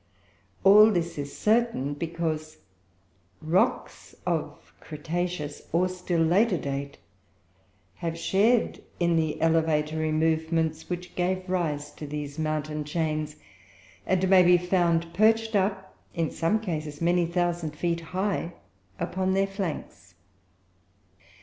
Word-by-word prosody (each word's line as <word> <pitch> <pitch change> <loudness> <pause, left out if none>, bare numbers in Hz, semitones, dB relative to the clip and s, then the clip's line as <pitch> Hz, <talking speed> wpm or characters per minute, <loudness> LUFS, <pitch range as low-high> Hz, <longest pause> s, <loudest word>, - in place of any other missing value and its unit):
All 210 +3 +8
this 170 -5 -1
is 140 0 -6
certain, 220 - +1
because 155 0 -3 0.8
rocks 160 +4 -1
of - - -3
cretaceous, 160 0 -4
or 175 +3 +2
still 180 -2 -1
later, 185 +4 +3
date 140 -1 -4 1.0
have 165 -1 -3
shared 210 +8 +2 0.2
in 170 -1 +2
the 160 -2 0
elevatory 155 -1 +1
movements 160 0 0
which 180 0 -5
gave 185 +1 -1
rise 150 -5 -2
to 150 - -9
these 145 0 -5
mountain 155 -1 -2
chains; 155 -1 -2 0.7
and 185 0 +2
may 190 -1 +7
be 180 0 +6
found 170 -2 +1
perched 225 +2 +3
up, 190 -1 -1 0.2
in 165 -2 -1
some 170 +7 +1
cases, 155 -7 -4
many 175 0 +2
thousand 170 -3 -1
feet 170 +2 -1
high 185 0 -2 0.5
upon 190 0 -1
their 195 0 +3
flanks. 165 - -6
170 Hz, 115 wpm, -27 LUFS, 155-185 Hz, 1.0 s, All